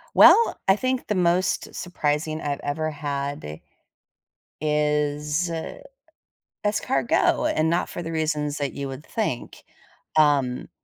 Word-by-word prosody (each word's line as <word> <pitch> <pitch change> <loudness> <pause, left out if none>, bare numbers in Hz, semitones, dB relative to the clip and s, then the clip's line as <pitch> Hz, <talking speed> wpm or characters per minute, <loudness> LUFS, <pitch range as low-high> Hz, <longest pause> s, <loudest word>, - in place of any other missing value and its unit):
Well, 465 - +7
I 190 - +6
think 255 +2 -1
the 210 - 0
most 180 0 +1
surprising 155 -2 -2
I've 145 -1 -2
ever 155 +2 -2
had 140 - -4 1.0
is 150 +2 0
uh, 165 - -5 0.9
escargot, 135 - +1
and 155 +1 +2
not 170 +1 0
for 175 - -6
the 165 - -5
reasons 150 -2 -1
that 140 -2 -2
you 140 -1 -4
would 135 +3 -8
think. 210 - -4 0.5
Um, 140 -5 +2
150 Hz, 120 wpm, -24 LUFS, 145-170 Hz, 1.0 s, Well